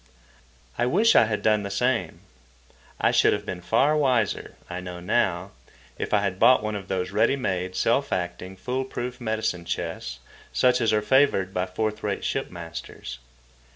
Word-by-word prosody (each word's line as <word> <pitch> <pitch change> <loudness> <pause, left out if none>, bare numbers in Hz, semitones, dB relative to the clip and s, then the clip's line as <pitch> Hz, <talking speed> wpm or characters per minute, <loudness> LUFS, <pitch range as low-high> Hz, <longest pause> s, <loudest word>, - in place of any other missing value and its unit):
I 120 - +2
wish 210 - +4
I - - +7
had 105 -1 -2
done 110 -1 +3
the 100 - -4
same. 120 +4 -1 0.8
I - - +3
should - - +4
have 105 0 -3
been 95 -3 -5
far 135 - +3
wiser, 130 -8 +1
I 90 0 -5
know 90 -1 -7
now, 90 - 0 0.5
if - - -3
I 105 - +3
had 95 -2 -2
bought 120 -1 +6
one 110 0 -2
of 100 -2 -5
those 95 -1 -2
ready 110 +6 +3
made, 95 -8 -2
self - - +1
acting, 90 +1 -3
fool 130 +6 -2
proof 125 -1 -5
medicine 110 -6 -1
chests 80 -7 -4 0.3
such 125 -1 +3
as 115 - +3
are 105 -1 +2
favoured 105 -7 +3
by 90 0 -1
fourth 105 +3 -2
rate 100 -2 -2
ship - - -1
masters. 85 -7 -8
105 Hz, 175 wpm, -25 LUFS, 90-125 Hz, 0.8 s, I